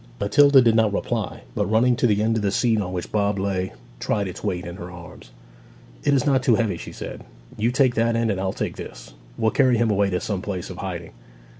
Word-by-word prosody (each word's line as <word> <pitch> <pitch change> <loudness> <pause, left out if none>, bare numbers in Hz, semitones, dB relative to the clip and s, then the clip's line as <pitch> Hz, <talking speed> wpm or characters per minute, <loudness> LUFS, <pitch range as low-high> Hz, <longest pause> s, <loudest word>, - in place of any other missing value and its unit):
Matilda 135 +6 +5
did 115 -2 +4
not 110 -2 +3
reply, 100 - -3
but 105 - -1
running 120 +3 +3
to 125 - +3
the 105 -1 +2
end 115 +1 +1
of 110 - 0
the 100 - +1
seat 110 +1 +1
on 90 -2 -4
which 90 -1 -5
Bob 100 -1 +1
lay, 95 -1 -2 0.3
tried 100 -2 -1
its 90 - -8
weight 90 0 -2
in 85 +1 -7
her 90 -2 -8
arms. 85 -8 -12 0.7
'It - - +2
is 140 -1 +2
not 135 -3 +3
too 125 -3 +3
heavy,' 110 -4 0
she - - -8
said. - - -8 0.3
'You 110 +3 +1
take 130 -1 +3
that 115 0 +1
end, 115 -1 +1
and 95 -1 -2
I'll 95 -1 -1
take - - -4
this. - - -10 0.2
We'll 110 0 +1
carry 125 0 +3
him 115 -1 +2
away 100 -1 +2
to 90 -1 -1
some 100 -1 -3
place 95 -2 -5
of 90 - -9
hiding.' 85 -3 -5
105 Hz, 240 wpm, -23 LUFS, 95-115 Hz, 0.7 s, Matilda